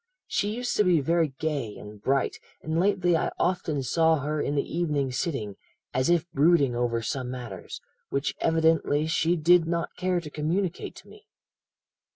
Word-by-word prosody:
She 210 +2 -1
used 245 +1 -2
to 210 - +5
be 180 -4 +4
very 165 +3 +2
gay 140 -9 -2
and 105 0 -11
bright, 135 +3 0 0.2
and 160 +1 -1
lately 180 -2 +2
I 160 - +1
often 165 -5 0
saw 160 +5 +3
her 150 +1 -1
in 145 - -1
the 140 - +2
evening 150 -6 -1
sitting, 125 - -3 0.4
as 130 +3 +1
if 175 -1 +2
brooding 145 -4 +3
over 120 -1 0
some 125 +2 -3
matters, 120 -8 -7 0.3
which 140 +2 -1
evidently 160 -2 +2
she 160 +2 +1
did 170 +1 +4
not 170 0 -2
care 180 -1 0
to 155 -3 -9
communicate 170 +5 -2
to - - -14
me.' 425 +1 -16
160 Hz, 170 wpm, -27 LUFS, 135-175 Hz, 0.4 s, to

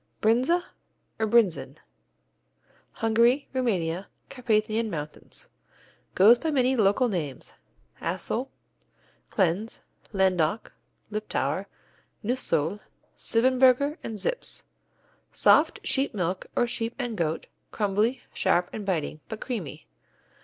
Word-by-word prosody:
Brinza, 255 +11 +3 0.6
or 220 - +1
Brinsen 215 -6 +2 1.2
Hungary, 235 +5 +3
Rumania, 190 -8 -1 0.2
Carpathian 220 -3 0
Mountains 150 -4 -6 0.7
Goes 225 +6 +7
by 320 - -1
many 265 -3 +2
local 220 +3 +3
names: 155 - -4 0.5
Altsohl, - - -2 0.8
Klencz, 190 +5 0 0.3
Landoch, 190 -1 +1 0.4
Liptauer, 215 0 -2 0.6
Neusohl, 210 - 0 0.4
Siebenburgen 255 +5 +3
and 220 - -5
Zips. - - -2 0.7
Soft, - - +4
sheep 270 -4 +1
milk 185 -1 -2
or - - +3
sheep 235 -1 -3
and 245 -4 -3
goat; 165 -4 -1 0.2
crumbly, 210 +4 0
sharp 180 -2 +1
and 215 - -5
biting, 165 -5 -2
but 220 -2 -5
creamy. 170 - -5
220 Hz, 95 wpm, -27 LUFS, 190-245 Hz, 1.2 s, Goes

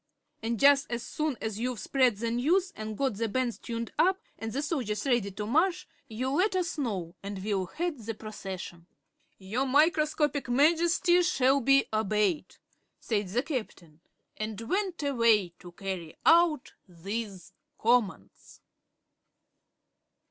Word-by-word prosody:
And 225 0 -2
jus' 280 0 +5
as 240 0 -4
soon 305 -4 -2
as 220 -1 -3
you've 245 -1 -2
spread 255 -5 +2
the 230 +2 -2
news 345 +11 +1
an' 215 - -6
got 260 -4 -1
the 230 +1 0
bands 250 +1 -1
tuned 230 -1 -5
up 375 +2 +4 0.2
and 225 0 -4
the 280 +6 -2
soldiers 255 - -2
ready 240 -7 +1
to 205 +2 -5
march, 335 - +1 0.2
you 250 +4 -3
let 375 +7 +2
us 360 -2 -1
know 190 - -3
and 195 -1 -6
we'll 195 -3 -1
head 330 - -3
the 225 0 -5
procession." 190 -5 -8 0.5
"Your 220 +8 -2
Microscopic 300 -1 +2
Majesty 335 +6 +4
shall 275 -6 +3
be 275 +2 +4
obeyed," 215 - 0 0.4
said 210 -3 -1
the 235 +8 -1
Captain, 180 - -6 0.4
and 215 -1 -4
went 365 - -2
away 230 -8 +3
to 175 -1 -11
carry 185 -4 -6
out 325 -4 +4
these 195 +2 -6 0.2
commands. 215 - -1
235 Hz, 140 wpm, -29 LUFS, 210-295 Hz, 0.5 s, jus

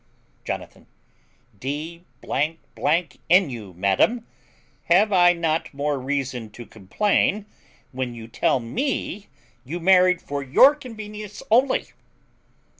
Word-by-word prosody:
Jonathan. - - -7 0.7
D 155 - -5 0.2
n 165 +3 0
you, 105 -6 -8
madam, 100 - +1 0.6
have 195 +5 +4
I 175 -1 +6
not 165 -2 -1
more 145 0 -1
reason 130 -4 -3
to 120 - -10
complain 195 - 0 0.5
when 125 -2 -4
you 115 -1 -9
tell 120 - +1
me 210 - -3 0.4
you 155 +7 -5
married 180 0 +4
for 140 0 -5
your 140 - +6
convenience 215 -6 -9
only? 255 +4 +3
165 Hz, 105 wpm, -23 LUFS, 130-205 Hz, 0.7 s, I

